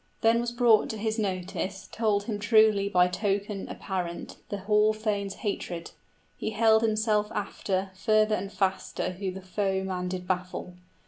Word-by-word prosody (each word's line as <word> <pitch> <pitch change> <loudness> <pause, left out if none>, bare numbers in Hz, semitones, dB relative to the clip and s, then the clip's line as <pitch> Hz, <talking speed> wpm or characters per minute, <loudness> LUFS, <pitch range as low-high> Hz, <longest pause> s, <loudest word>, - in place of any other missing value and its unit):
Then 230 +1 +4
was 240 0 -2
brought 240 -3 +4
to 220 - -4
his 220 +1 -1
notice 190 -1 -3
Told 210 -3 +1
him 210 -1 -3
truly 210 -2 +4
by 180 -2 +4
token 200 +2 -2
apparent 180 -3 -4
The 205 - -2
hall 210 +2 +3
thane's 205 -2 -2
hatred: 175 -4 -3 0.4
he - - -3
held 220 0 +4
himself 215 -1 +1
after 195 -2 -2
Further 215 +2 +3
and 200 -2 -2
faster 190 -2 -1
who 190 +1 -4
the 190 +1 -7
foeman 190 -1 -1
did 180 0 -4
baffle. 180 0 -3
205 Hz, 150 wpm, -28 LUFS, 190-215 Hz, 0.4 s, Then